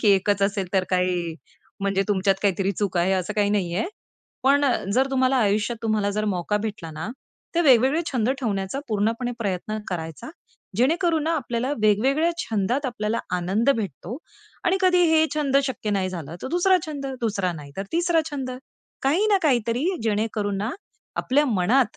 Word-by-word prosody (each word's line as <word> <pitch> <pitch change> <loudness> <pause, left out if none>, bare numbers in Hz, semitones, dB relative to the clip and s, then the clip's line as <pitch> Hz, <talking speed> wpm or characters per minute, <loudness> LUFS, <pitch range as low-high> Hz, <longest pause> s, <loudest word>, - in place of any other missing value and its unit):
की 215 - +3
एकच 200 +1 +1
असेल 195 -1 0
तर 190 -2 +2
काय 180 -1 +2 0.7
म्हणजे 195 0 +1
तुमच्यात 195 -1 +2
काहीतरी 195 -1 +1
चूक 195 -1 -2
आहे 180 +3 +2
असं 190 +2 -1
काही 205 -1 +2
नाहीये. 185 -2 0 0.6
पण 280 +2 +4
अ, 260 - +3 0.2
जर 260 +5 +3
तुम्हाला 260 0 +2
आयुष्यात 215 0 +1
तुम्हाला 215 -2 +1
जर 215 +1 -1
मौका 200 0 0
भेटला 210 -5 -4
ना, 155 +1 -5 0.5
तर 340 - +3
वेगवेगळे 265 +2 +5
छंद 240 -3 +1
ठेवण्याचा 200 0 -2
पूर्णपणे 225 +3 0
प्रयत्न 210 0 -2
करायचा, 165 - -5 0.5
जेणेकरून 320 - +2
ना 320 - 0
आपल्याला 245 -2 -2
वेगवेगळ्या 265 +10 +3
छंदात 225 +5 -1
आपल्याला 230 -2 -2 0.2
आनंद 195 +9 +1
भेटतो 200 - -5 0.5
आणि 365 +1 +3
कधी 365 -1 +4
हे 315 0 +5
छंद 285 -3 +1
शक्य 250 -5 -3
नाही 195 -2 0
झालं, 165 -4 -6
तर - - -3
दुसरा 355 +4 +4
छंद. 285 -3 -5
दुसरा 200 -6 0
नाही 145 -4 -10
तर 195 - -2
तिसरा 340 0 +3
छंद. 270 -3 -4 0.5
काही 320 +11 +2
ना 415 -2 +4
काहीतरी 245 -3 +1 0.2
जेणेकरून 210 -2 -1
ना 210 +4 -1 0.5
आपल्या 285 +3 +2
मनात 225 +2 +2
215 Hz, 165 wpm, -24 LUFS, 195-270 Hz, 0.7 s, वेगवेगळे